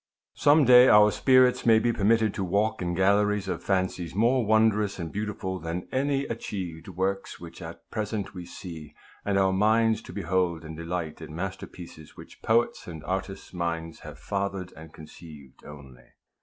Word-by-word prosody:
Some 145 Hz, +1 st, +4 dB
day 125 Hz, +1 st, +8 dB
our 105 Hz, -2 st, +6 dB
spirits 130 Hz, 0 st, +4 dB
may 115 Hz, -1 st, +5 dB
be 120 Hz, +1 st, +1 dB
permitted 110 Hz, 0 st, +2 dB
to 100 Hz, -, -3 dB
walk 100 Hz, +4 st, 0 dB
in 85 Hz, -1 st, -2 dB
galleries 100 Hz, +1 st, +2 dB
of 95 Hz, -, -3 dB
fancies 95 Hz, -3 st, -1 dB
more 120 Hz, +4 st, +3 dB
wondrous 110 Hz, -1 st, +2 dB
and 85 Hz, -3 st, -5 dB
beautiful 100 Hz, -3 st, -4 dB
than 85 Hz, +2 st, -5 dB
any 140 Hz, +1 st, 0 dB
achieved 90 Hz, -8 st, -6 dB
works 95 Hz, +1 st, -3 dB
which 85 Hz, +1 st, -11 dB
at 85 Hz, 0 st, -10 dB
present 105 Hz, -2 st, -3 dB
we 90 Hz, -2 st, -8 dB
see, 85 Hz, -4 st, -10 dB, 0.3 s
and 100 Hz, -1 st, 0 dB
our 95 Hz, -1 st, +3 dB
minds 110 Hz, +3 st, +2 dB
to -, -, -11 dB
behold 90 Hz, -3 st, -1 dB
and 80 Hz, 0 st, -8 dB
delight 85 Hz, -1 st, -5 dB
in 80 Hz, -1 st, -9 dB
masterpieces 90 Hz, -3 st, -8 dB
which -, -, -14 dB
poets' 115 Hz, +2 st, +1 dB
and 80 Hz, -3 st, -8 dB
artists' 95 Hz, +2 st, -5 dB
minds 85 Hz, -2 st, -4 dB
have -, -, -11 dB
fathered 100 Hz, -2 st, -4 dB
and 80 Hz, 0 st, -12 dB
conceived 75 Hz, -3 st, -14 dB
only. 65 Hz, -4 st, -13 dB
95 Hz, 165 wpm, -26 LUFS, 85-110 Hz, 0.3 s, day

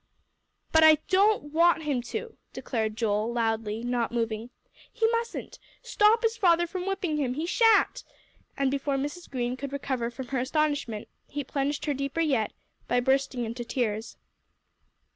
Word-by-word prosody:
"But 320 Hz, 0 st, +5 dB
I 315 Hz, 0 st, +9 dB
don't 390 Hz, -6 st, +3 dB
want 335 Hz, 0 st, +4 dB
him 285 Hz, -5 st, 0 dB
to," 465 Hz, -2 st, -5 dB, 0.2 s
declared 220 Hz, -3 st, -3 dB
Joel, 220 Hz, 0 st, 0 dB
loudly, 225 Hz, -1 st, -1 dB
not 245 Hz, -1 st, -1 dB
moving. 230 Hz, -1 st, -2 dB, 0.4 s
"He 460 Hz, -1 st, 0 dB
mustn't! 465 Hz, 0 st, -3 dB, 0.2 s
Stop 435 Hz, +3 st, +3 dB
his 455 Hz, 0 st, +1 dB
father 345 Hz, -4 st, +4 dB
from 360 Hz, +2 st, -5 dB
whipping 365 Hz, -5 st, -1 dB
him! 260 Hz, -4 st, -1 dB
He 310 Hz, +4 st, -2 dB
shan't." 450 Hz, +4 st, +3 dB, 0.5 s
And 275 Hz, -1 st, +1 dB
before 280 Hz, 0 st, -1 dB
Mrs. 290 Hz, +6 st, -5 dB
Green 245 Hz, -2 st, -2 dB
could 275 Hz, +1 st, -6 dB
recover 260 Hz, -4 st, -2 dB
from 240 Hz, +1 st, -8 dB
her 265 Hz, -, -1 dB
astonishment, 280 Hz, -5 st, -1 dB, 0.2 s
he 290 Hz, 0 st, -4 dB
plunged 280 Hz, +2 st, -2 dB
her 295 Hz, -, +1 dB
deeper 275 Hz, +3 st, -3 dB
yet, 270 Hz, -10 st, +1 dB, 0.4 s
by 245 Hz, -, +2 dB
bursting 265 Hz, -1 st, +1 dB
into 235 Hz, +2 st, -5 dB
tears. 230 Hz, -2 st, -2 dB
275 Hz, 155 wpm, -27 LUFS, 240-330 Hz, 0.5 s, I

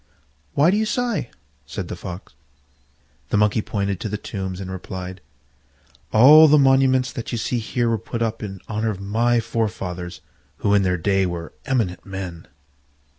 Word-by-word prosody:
"Why 150 Hz, +5 st, +5 dB
do 205 Hz, -, +2 dB
you 220 Hz, -, +1 dB
sigh?" 240 Hz, -, -1 dB, 0.4 s
said -, -, -5 dB
the -, -, -5 dB
Fox. 90 Hz, -2 st, -8 dB, 1.0 s
The -, -, +1 dB
Monkey 105 Hz, +1 st, +3 dB
pointed 100 Hz, -3 st, -2 dB
to 110 Hz, -, -4 dB
the 105 Hz, -, -2 dB
tombs 95 Hz, -3 st, -5 dB
and 95 Hz, -1 st, -6 dB
replied, 95 Hz, 0 st, -7 dB, 0.9 s
"All 150 Hz, +8 st, +9 dB
the 150 Hz, 0 st, +6 dB
monuments 135 Hz, -2 st, +4 dB
that 115 Hz, -, -5 dB
you 120 Hz, -, -2 dB
see 120 Hz, +2 st, -1 dB
here 120 Hz, +1 st, -1 dB
were 115 Hz, -1 st, +1 dB
put 115 Hz, +4 st, -3 dB
up 115 Hz, 0 st, -2 dB
in 95 Hz, -4 st, -6 dB
honour 110 Hz, 0 st, -1 dB
of 100 Hz, -3 st, -4 dB
my 115 Hz, +4 st, +1 dB
forefathers, 95 Hz, -6 st, -3 dB, 0.4 s
who 100 Hz, -, +4 dB
in 100 Hz, -, +5 dB
their 90 Hz, -1 st, +1 dB
day 95 Hz, +2 st, +1 dB
were 85 Hz, -1 st, -6 dB
eminent 115 Hz, -10 st, 0 dB
men." 95 Hz, -4 st, -7 dB
105 Hz, 170 wpm, -22 LUFS, 95-120 Hz, 1.0 s, All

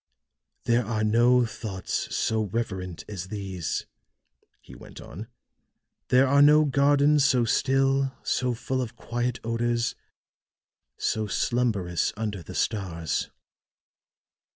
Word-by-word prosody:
"There 120 Hz, +1 st, +2 dB
are 110 Hz, -1 st, -2 dB
no 120 Hz, +3 st, +4 dB
thoughts 105 Hz, -4 st, -4 dB
so 110 Hz, -1 st, 0 dB
reverent 95 Hz, -5 st, -4 dB
as 95 Hz, -4 st, -6 dB
these," 95 Hz, -6 st, -4 dB, 0.7 s
he -, -, -15 dB
went -, -, -12 dB
on; 105 Hz, +8 st, -9 dB, 0.8 s
"there 130 Hz, +2 st, +5 dB
are 140 Hz, +2 st, +4 dB
no 150 Hz, +1 st, +6 dB
gardens 145 Hz, +1 st, +3 dB
so 130 Hz, -4 st, +3 dB
still, 135 Hz, +3 st, +2 dB
so 125 Hz, -2 st, 0 dB
full 130 Hz, +3 st, -2 dB
of 120 Hz, -3 st, -5 dB
quiet 120 Hz, 0 st, -3 dB
odors, 120 Hz, +1 st, 0 dB, 1.0 s
so 110 Hz, -1 st, -1 dB
slumberous 100 Hz, -6 st, 0 dB
under 105 Hz, -4 st, -3 dB
the 80 Hz, -, -10 dB
stars. 85 Hz, -7 st, -2 dB
115 Hz, 110 wpm, -26 LUFS, 100-130 Hz, 1.0 s, no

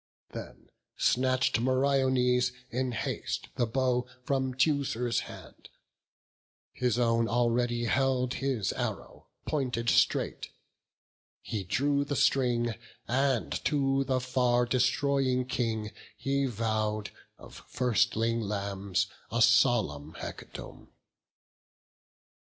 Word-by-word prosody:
Then -, -, -9 dB, 0.3 s
snatch'd 130 Hz, -1 st, +2 dB
Meriones 130 Hz, -1 st, +2 dB, 0.2 s
in 125 Hz, +1 st, -1 dB
haste 110 Hz, -, -3 dB
the 120 Hz, -, +1 dB
bow 125 Hz, 0 st, 0 dB, 0.2 s
From 130 Hz, -2 st, -1 dB
Teucer's 130 Hz, -5 st, +1 dB
hand; -, -, -12 dB, 1.0 s
his 125 Hz, -2 st, 0 dB
own 115 Hz, -1 st, +2 dB
already 120 Hz, 0 st, +1 dB
held 130 Hz, +2 st, +1 dB
His 130 Hz, -8 st, -1 dB
arrow, -, -, -5 dB, 0.2 s
pointed 125 Hz, -6 st, 0 dB
straight; -, -, +1 dB, 0.9 s
he 105 Hz, -4 st, -4 dB
drew 140 Hz, +9 st, +1 dB
the 145 Hz, 0 st, -3 dB
string, 120 Hz, -4 st, +2 dB, 0.3 s
And 130 Hz, -1 st, 0 dB
to 135 Hz, -2 st, +2 dB
the 130 Hz, -1 st, 0 dB
far 125 Hz, -1 st, +2 dB
destroying 130 Hz, +1 st, +1 dB
King 110 Hz, -4 st, -2 dB, 0.3 s
he 140 Hz, 0 st, 0 dB
vow'd 110 Hz, -2 st, -1 dB, 0.3 s
Of -, -, -13 dB
firstling 115 Hz, -1 st, +1 dB
lambs 100 Hz, -2 st, -1 dB, 0.3 s
a 120 Hz, -, 0 dB
solemn 80 Hz, -, +3 dB
hecatomb. -, -, -9 dB
125 Hz, 95 wpm, -29 LUFS, 115-130 Hz, 1.0 s, solemn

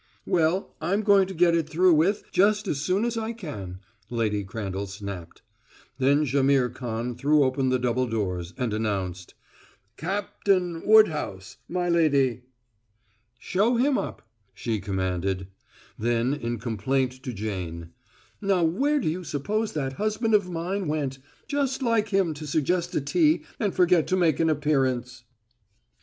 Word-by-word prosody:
"Well, 170 Hz, +3 st, +1 dB
I'm 195 Hz, +6 st, 0 dB
going 200 Hz, -2 st, +5 dB
to 190 Hz, -, -6 dB
get 170 Hz, 0 st, +4 dB
it 165 Hz, -2 st, 0 dB
through 175 Hz, +3 st, +4 dB
with 180 Hz, +7 st, +2 dB
just 205 Hz, +2 st, +3 dB
as 140 Hz, -, -1 dB
soon 190 Hz, +8 st, +1 dB
as 235 Hz, -1 st, -1 dB
I 225 Hz, +1 st, -3 dB
can," 100 Hz, -, -7 dB, 0.3 s
Lady 110 Hz, -4 st, -1 dB
Crandall 100 Hz, 0 st, -4 dB
snapped. 95 Hz, -3 st, -8 dB, 0.6 s
Then 140 Hz, +3 st, +3 dB
Jaimihr 135 Hz, -1 st, +2 dB
Khan 120 Hz, 0 st, -4 dB
threw 145 Hz, +4 st, +3 dB
open 130 Hz, 0 st, +1 dB
the 130 Hz, -, +2 dB
double 125 Hz, 0 st, 0 dB
doors 90 Hz, -6 st, -2 dB
and 120 Hz, -4 st, -1 dB
announced: 95 Hz, -5 st, -3 dB, 0.6 s
"Cap 200 Hz, +4 st, -4 dB
tain 180 Hz, -4 st, +2 dB
Wood 215 Hz, -1 st, +8 dB
house, 95 Hz, -, -6 dB
my 180 Hz, 0 st, -1 dB
lady!" 140 Hz, -8 st, +2 dB, 1.0 s
"Show 205 Hz, -, +1 dB
him 265 Hz, +4 st, +2 dB
up!" -, -, -4 dB, 0.3 s
she 115 Hz, -3 st, -2 dB
commanded; 95 Hz, -1 st, -2 dB, 0.5 s
then 120 Hz, +3 st, +1 dB
in 120 Hz, -5 st, -3 dB
complaint 130 Hz, +4 st, -1 dB
to 130 Hz, -2 st, -5 dB
Jane: 90 Hz, -6 st, -5 dB, 0.5 s
"Now 195 Hz, -3 st, +2 dB
where 275 Hz, -, +2 dB
do 245 Hz, -, -2 dB
you 175 Hz, +4 st, -2 dB
suppose 205 Hz, +9 st, -2 dB
that 135 Hz, -3 st, -2 dB
husband 215 Hz, +1 st, 0 dB
of 200 Hz, -3 st, +3 dB
mine 180 Hz, +2 st, -3 dB
went? 145 Hz, -3 st, -2 dB, 0.3 s
Just 275 Hz, -2 st, -1 dB
like 230 Hz, -3 st, +1 dB
him 190 Hz, -5 st, +1 dB
to 150 Hz, 0 st, -8 dB
suggest 170 Hz, +4 st, 0 dB
a -, -, +1 dB
tea 310 Hz, -, +2 dB, 0.2 s
and 205 Hz, -4 st, +1 dB
forget 180 Hz, -3 st, +3 dB
to 185 Hz, -, +1 dB
make 165 Hz, -6 st, +2 dB
an 165 Hz, -1 st, +3 dB
appearance." 130 Hz, -5 st, 0 dB
150 Hz, 150 wpm, -26 LUFS, 115-185 Hz, 1.0 s, Wood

